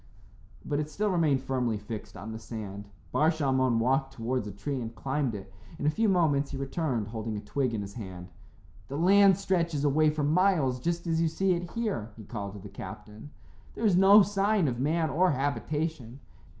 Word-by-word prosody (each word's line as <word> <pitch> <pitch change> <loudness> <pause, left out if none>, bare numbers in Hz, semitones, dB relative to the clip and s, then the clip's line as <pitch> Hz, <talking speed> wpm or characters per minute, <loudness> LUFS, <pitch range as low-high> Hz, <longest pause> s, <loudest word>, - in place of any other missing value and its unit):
But 145 - -1
it 150 0 -3
still 205 +6 -1
remained 155 -7 +2
firmly 125 -4 -1
fixed 105 +1 -8
on 100 +5 -7
the 110 - -6
sand. 105 -3 -7 0.2
Bar 155 +2 +3
Shalmon 130 -6 +1
walked 135 +3 +1
towards 120 -2 -2
a - - -5
tree 130 +7 -4
and 115 0 -6
climbed 135 -1 -1
it. 95 -1 -9 0.2
In 145 - -4
a 150 - +4
few 220 +6 +1
moments 150 -7 +2
he 140 - -5
returned, 135 -5 -2
holding 110 -1 -4
a - - -3
twig 130 +3 -1
in 105 - -2
his 100 0 -9
hand. 95 -5 -8 0.6
"The 140 - -5
land 195 +2 +6
stretches 170 -6 0
away 155 +2 +4
for 150 0 -2
miles 155 -5 +2
just 170 +5 -2
as 165 -1 +1
you 165 - +3
see 190 +4 0
it 175 -1 -1
here," 210 - -2
he 110 - -9
called 100 -1 -6
to 105 - -9
the 100 - -9
captain. 105 +4 -9 0.5
"There 225 - -2
is 200 -4 +4
no 195 +3 +8
sign 200 -2 +1
of 120 -2 -2
man 160 +3 +1
or 180 +6 +3
habitation." 140 -1 -2
140 Hz, 200 wpm, -28 LUFS, 115-170 Hz, 0.6 s, no